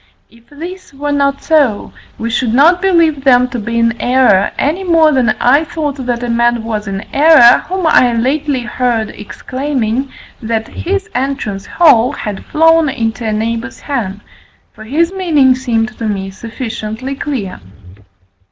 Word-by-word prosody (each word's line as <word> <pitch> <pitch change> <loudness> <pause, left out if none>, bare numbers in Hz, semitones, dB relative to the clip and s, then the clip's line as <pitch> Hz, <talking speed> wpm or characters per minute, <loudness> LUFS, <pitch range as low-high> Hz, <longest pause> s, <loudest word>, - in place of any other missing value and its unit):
If 230 0 -23
this 345 +2 -10
were 290 +1 -3
not 280 -1 0
so, 285 -10 +1 0.2
we 230 +1 -4
should 240 -1 0
not 340 +6 +4
believe 335 -7 +2
them 250 -2 +4
to 240 - -4
be 230 +2 -4
in 230 0 0
error, 245 -6 +3
any 320 +7 -1
more 330 -4 +4
than 245 -6 +1
I 280 +6 +3
thought 295 -4 -4
that 240 0 -2
a - - -2
man 235 0 +1
was 215 -2 -4
in 195 0 -4
error, 285 -5 +6
whom 375 -1 -2
I 250 -6 +4
lately 270 +3 -1
heard 240 -2 -2
exclaiming 260 +3 -4 0.3
that 225 -1 -2
his 395 +3 -3
entrance 250 -7 -3
hall 270 -9 +4
had 210 -3 -6
flown 325 0 +3
into 230 -2 -3
a - - 0
neighbour's 230 +4 -3
hen, 210 -8 -4 0.5
for 215 - -12
his 330 +9 0
meaning 310 -9 +3
seemed 240 -2 -2
to 225 - -2
me 195 -2 -3
sufficiently 225 +3 -6
clear. 265 - -5
255 Hz, 155 wpm, -14 LUFS, 230-295 Hz, 0.5 s, error